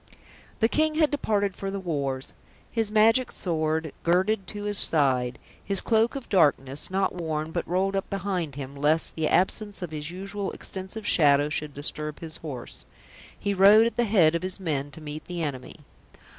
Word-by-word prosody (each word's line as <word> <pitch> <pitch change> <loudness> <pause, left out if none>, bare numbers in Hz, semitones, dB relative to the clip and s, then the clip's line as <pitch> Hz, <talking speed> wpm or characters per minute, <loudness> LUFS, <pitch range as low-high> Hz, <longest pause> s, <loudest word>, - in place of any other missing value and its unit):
The 225 - +5
King 310 +5 +1
had 310 -2 +3
departed 205 -9 0
for 195 - -4
the 195 0 -3
wars. 140 -7 -3 0.4
His 225 -3 0
magic 225 +4 +4
sword 160 -2 -1
girded 190 +3 +1
to 205 +1 -6
his 205 -1 -1
side, 130 -5 +2 0.3
his 195 -1 +1
cloak 225 +2 +2
of 270 -3 -6
darkness, 145 -6 +2
not 190 +1 0
worn 160 -3 -3
but - - -3
rolled 190 +3 0
up 195 - -2
behind 185 -7 -2
him, 140 -1 -7
lest 150 +3 +1
the 160 -1 0
absence 205 +1 +1
of 175 - -5
his 150 0 -5
usual 195 +2 -5
extensive 190 +3 -7
shadow 145 -4 +4
should 150 -1 -3
disturb 150 +1 -4
his 160 -1 -6
horse, 135 -7 -7 0.5
he 200 - -1
rode 200 +3 +7
at 235 - -1
the 240 - +2
head 185 -7 +4
of 170 - -1
his 185 +1 -3
men 145 -6 -2
to 150 +3 -12
meet 155 0 -7
the 175 -2 -4
enemy. 140 0 -6
180 Hz, 180 wpm, -26 LUFS, 150-200 Hz, 0.5 s, rode